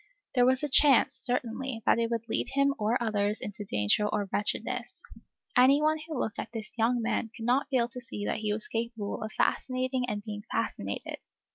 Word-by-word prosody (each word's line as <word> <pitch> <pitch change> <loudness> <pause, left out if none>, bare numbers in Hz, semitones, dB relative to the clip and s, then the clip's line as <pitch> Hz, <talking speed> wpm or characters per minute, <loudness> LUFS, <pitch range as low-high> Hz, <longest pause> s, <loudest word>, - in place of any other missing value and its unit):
There 245 -1 +4
was 260 +2 +2
a - - +1
chance, 275 -2 +5
certainly, 245 -1 -2
that - - +4
it 230 0 +1
would 230 -1 -3
lead 230 - 0
him 280 0 +3
or 215 +3 +2
others 210 -2 0
into 205 0 -6
danger 105 - +1
or 205 -1 -1
wretchedness. 240 +4 -2 0.5
Any 265 +3 +6
one 310 +1 +2
who 315 -4 -4
looked 220 - -2
at - - -4
this 225 -2 -6
young 235 +1 +1
man 225 0 -1
could 225 - -6
not 250 +4 +2
fail 250 -4 +2
to 250 0 -8
see 210 -3 -5
that - - -1
he 215 -1 -1
was 210 +1 -1
capable 225 -2 -3
of 215 - -4
fascinating 255 -1 0
and 205 -1 -3
being 210 -1 -6
fascinated. - - -3
235 Hz, 200 wpm, -29 LUFS, 215-255 Hz, 0.5 s, Any